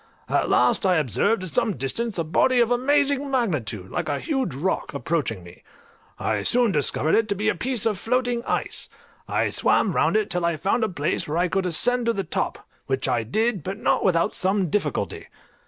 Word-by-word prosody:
At - - 0
last 125 - +3
I 185 -2 +3
observed 160 - +1
at 185 - -4
some 180 +5 0
distance 200 - -1
a 165 - 0
body 245 +10 +2
of 235 0 +3
amazing 280 +2 +1
magnitude, 150 - -2
like - - -3
a 145 - 0
huge 270 - -2
rock, 155 0 -2
approaching 140 - -2
me; 85 0 -14 0.6
I 105 -2 -1
soon 240 - +3
discovered 150 0 0
it 225 -1 +2
to 200 - +1
be 210 +3 0
a - - +2
piece 245 -4 -1
of 210 -4 0
floating 245 0 0
ice; - - -2 0.4
I - - 0
swam - - +2
round - - +2
it 430 - -1
till 180 -1 -1
I 170 -1 0
found 195 +8 0
a 220 - +1
place 170 -1 -1
where 150 +2 -2
I 180 +1 +2
could 190 0 0
ascend 240 +8 +3
to 230 - +3
the 195 - -2
top, 165 - -3 0.2
which 135 0 -1
I 125 -3 +1
did, 215 - -1
but 190 +5 -5
not - - +1
without 170 -3 +2
some 190 -3 0
difficulty. 210 - -2
190 Hz, 205 wpm, -24 LUFS, 155-235 Hz, 0.6 s, last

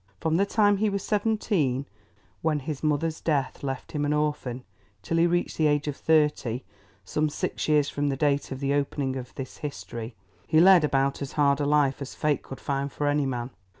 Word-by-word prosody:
From 160 0 +1
the 200 +2 +2
time 205 -1 +3
he 215 +2 +2
was 200 -1 -2
seventeen, 200 - 0 0.6
when 155 -2 0
his 145 0 -5
mother's 155 +1 0
death 140 -5 -1
left 135 -2 -4
him 150 -1 -2
an 145 0 +1
orphan, 150 -4 -1 0.4
till 165 - -1
he 170 +1 +5
reached 175 0 -1
the 155 - +4
age 145 0 +1
of 145 - -2
thirty, 150 -7 +1 0.4
some 155 +6 0
six - - -3
years 150 -2 +3
from 145 0 -1
the 135 - -1
date 140 -1 +1
of 135 +1 -5
the 140 0 +1
opening 140 -1 -1
of 125 -1 -7
this 130 -1 -7
history, 120 -5 -6 0.3
he 155 0 +4
led 180 -1 +7
about 140 -1 +1
as 140 - -5
hard 140 -1 +3
a 145 - 0
life 145 -2 +2
as 135 - -6
fate 150 -1 0
could 135 - -9
find 140 0 -2
for 145 - -3
any 145 -1 +2
man. 125 -1 -3
145 Hz, 205 wpm, -26 LUFS, 135-155 Hz, 0.6 s, led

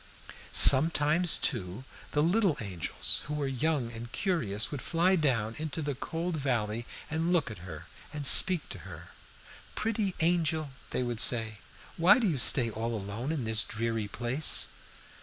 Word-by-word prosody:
"Sometimes, 155 +4 +5
too, 90 +7 -4 0.3
the 150 - +1
little 180 -2 0
angels, 95 -8 -1
who 150 - -6
were 145 -1 -3
young 135 -2 -2
and 115 +1 -10
curious, 115 - -2
would 145 -4 -6
fly 175 +3 0
down 120 - -1
into 155 0 -5
the 145 -2 -4
cold 165 +5 -5
valley 120 -5 -3 0.2
and 165 +2 -2
look 165 -9 0
at 105 - -11
her 85 -3 -11 0.3
and 150 -1 -6
speak 180 +3 +5
to - - -9
her. - - -12 0.7
"'Pretty 210 -3 -3
angel,' 160 -3 -1 0.2
they 125 - -3
would 120 -2 -5
say, 110 -4 +4 0.4
'why 175 +8 +5
do 235 -4 -1
you 160 -7 -2
stay 120 -1 +6
all 115 +2 -5
alone 105 +8 -6
in 155 -6 -4
this 110 -1 +1
dreary 115 -1 -4
place?' 120 +7 +1
140 Hz, 160 wpm, -28 LUFS, 115-165 Hz, 0.7 s, stay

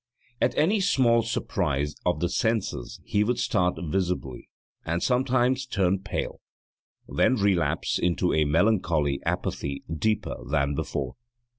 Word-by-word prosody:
At 125 - +1
any 195 +8 +3
small 125 -11 +3
surprise 75 -10 -1
of 90 - +1
the 85 - +2
senses 110 - -1
he 105 - +2
would 120 +3 0
start 90 -4 +1
visibly 90 -6 -2 0.3
and 85 +2 -2
sometimes 130 0 +2
turn 95 -5 +1
pale, 95 - -4 0.7
then 130 - +2
relapse 95 - +1
into 85 -4 +1
a 80 -1 +3
melancholy 80 -4 +2
apathy 70 0 -2 0.2
deeper 110 -1 0
than 70 -1 +1
before. 70 -1 -3
95 Hz, 125 wpm, -26 LUFS, 75-115 Hz, 0.7 s, any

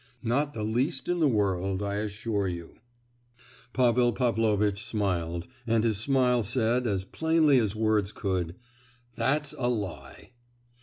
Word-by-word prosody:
"Not 140 +5 0
the 110 - -3
least 120 +5 -1
in 175 0 0
the 155 - +4
world, 95 -4 0
I 100 0 -2
assure 105 -1 -2
you!" 85 -2 -6 0.9
Pavel 120 -1 +3
Pavlovitch 110 -4 +1
smiled; 85 -5 -2 0.2
and 115 -1 +2
his 110 -3 +1
smile 125 0 +2
said, 120 +2 +1
as 95 -3 -1
plainly 160 0 +3
as 110 -3 0
words 110 -2 +1
could, 90 -6 -2 0.6
"That's 145 +4 0
a 120 -1 +1
lie!" 95 - -5
110 Hz, 135 wpm, -28 LUFS, 100-125 Hz, 0.9 s, the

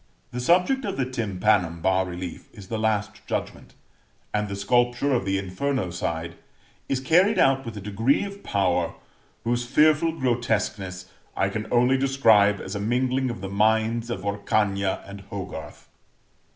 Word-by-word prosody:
The 125 - -4
subject 180 - +3
of 200 -4 -3
the 135 - +1
tympanum 100 -7 0
bas 95 +2 +1
relief 90 -1 -7
is 95 -2 -12
the 110 - -2
Last 110 -1 -1
Judgment, - - -4 0.6
and 105 0 0
the 100 - -3
sculpture 120 +6 +1
of 120 -6 0
the 95 0 +1
inferno 95 +2 -2
side 85 -1 -3 0.6
is 135 - +1
carried 180 +10 +3
out 135 0 +4
with 115 -2 -6
a - - -6
degree 110 - +1
of 200 0 -7
power 90 - 0 0.5
whose 120 +1 0
fearful 155 +4 +4
grotesqueness 110 - -1 0.3
I 95 - +2
can 110 +2 -4
only 125 +2 +3
describe 110 -7 +4
as 95 - -6
a 100 - -3
mingling 130 +4 0
of 120 -5 -6
the 95 - -4
minds 110 +3 +1
of 100 -5 -4
Orcagna 100 -1 0
and 100 0 -9
Hogarth. 90 -6 -7
110 Hz, 155 wpm, -25 LUFS, 95-130 Hz, 0.6 s, out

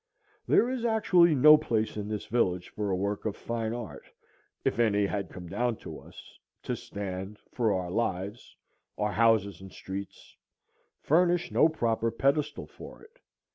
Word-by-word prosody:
There 235 - +4
is 255 -2 -3
actually 185 -8 +4
no 150 +3 +8
place 110 -5 -1
in 105 -1 -4
this 105 -1 -4
village 90 -6 0
for 105 -1 -3
a 95 - +1
work 100 +2 -2
of 110 - -2
fine 115 -1 -3
art, 120 -4 -7 0.6
if - - 0
any 105 -3 +3
had 100 -2 -3
come 90 - -9
down 120 +6 -1
to - - -7
us, - - -15 0.2
to - - -2
stand, 95 0 -6
for 115 -4 +1
our 90 -2 -2
lives, 100 0 -3 0.4
our 105 0 0
houses 105 -2 +2
and 95 0 -11
streets, 95 +1 -8 0.7
furnish 175 +2 +2
no 160 - +5
proper 115 -6 0
pedestal 140 +6 0
for - - -13
it. 450 +3 -20
110 Hz, 160 wpm, -28 LUFS, 100-140 Hz, 0.7 s, no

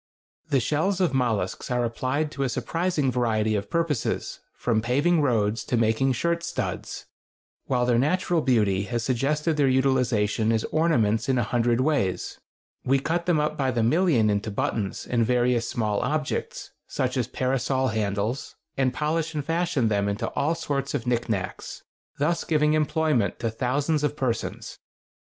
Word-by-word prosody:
The 140 -3 +3
shells 155 +9 0
of 180 -7 +1
mollusks 115 -8 -1
are 125 -1 +1
applied 130 +6 -1
to 140 - -5
a 135 - +1
surprising 150 +3 -1
variety 110 -3 +1
of 100 -1 -2
purposes, 165 -7 -1 0.2
from 115 -3 0
paving 145 +8 +2
roads 115 -5 +1
to 125 - 0
making 115 +4 +2
shirt 170 +6 0
studs, 170 0 -4 0.6
while 125 -2 +1
their 120 -1 +3
natural 175 +4 +1
beauty 105 -8 +2
has 120 +1 -2
suggested 150 +6 0
their 145 -2 +3
utilization 125 -5 +2
as 110 -1 +1
ornaments 120 -9 +2
in 130 - +2
a 120 - +2
hundred 120 +2 +1
ways. 130 -10 -1 0.4
We 135 +2 +3
cut 170 +5 -2
them 170 -4 +3
up 150 0 0
by 135 -2 0
the 120 -3 0
million 120 - +3
into 105 +2 -1
buttons 100 0 -2
and 120 -2 +1
various 120 0 +1
small 105 -3 -1
objects, 150 +3 -3 0.2
such - - -2
as - - 0
parasol 130 0 0
handles, 105 +3 -2 0.2
and 130 -1 +1
polish 160 +1 -1
and 145 -2 -2
fashion 165 -6 0
them 100 -1 +1
into 100 +1 -2
all 160 +4 0
sorts 140 -4 -2
of 115 - -3
knickknacks, 115 -5 -3 0.3
thus 165 +4 0
giving 150 -1 +2
employment 155 -6 +1
to 115 - -2
thousands 140 +6 0
of 150 0 -1
persons. 125 -5 -3
130 Hz, 160 wpm, -25 LUFS, 115-150 Hz, 0.6 s, The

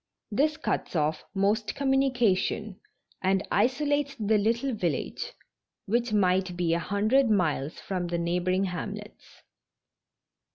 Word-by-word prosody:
This 305 +8 +2
cuts 310 - -2
off 155 0 0
most 205 +3 +1
communication 245 -7 +1 0.4
and 190 +1 +1
isolates 285 +2 +1
the 215 -3 +2
little 235 +5 +1
village, 175 -9 -2 0.5
which 235 +3 0
might 185 -3 +2
be 170 -2 +1
a 170 - +1
hundred 215 +8 +2
miles 160 -8 0
from 180 -2 -3
the 170 0 -1
neigh 170 +1 0
boring 185 +2 +1
hamlets. 200 +3 -6
205 Hz, 120 wpm, -28 LUFS, 180-240 Hz, 0.5 s, This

